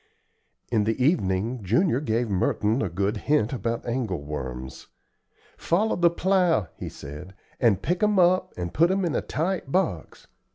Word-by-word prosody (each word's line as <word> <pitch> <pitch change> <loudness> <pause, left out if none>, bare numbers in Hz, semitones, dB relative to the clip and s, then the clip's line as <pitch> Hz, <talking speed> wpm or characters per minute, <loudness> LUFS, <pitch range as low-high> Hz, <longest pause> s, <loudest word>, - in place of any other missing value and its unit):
In 110 -3 +2
the 110 +3 -1
evening 120 - +1
Junior 120 - +2
gave 120 -3 0
Merton 105 +4 0
a - - -1
good 100 +5 -1
hint 135 -1 +1
about 115 0 -3
angle 115 - -2
worms. 65 -3 -6 0.7
"Follow 205 +6 +1
the 175 -1 +4
plow," 170 - +1
he - - -6
said, 75 +7 -10 0.2
"and 110 -6 +2
pick 175 +1 -1
'em 210 -1 +3
up 185 +1 +3
and 85 0 -4
put 170 +3 +4
'em 190 0 +1
in 165 - -1
a - - 0
tight 165 -3 -2
box. 150 - -2
120 Hz, 160 wpm, -25 LUFS, -, 0.7 s, the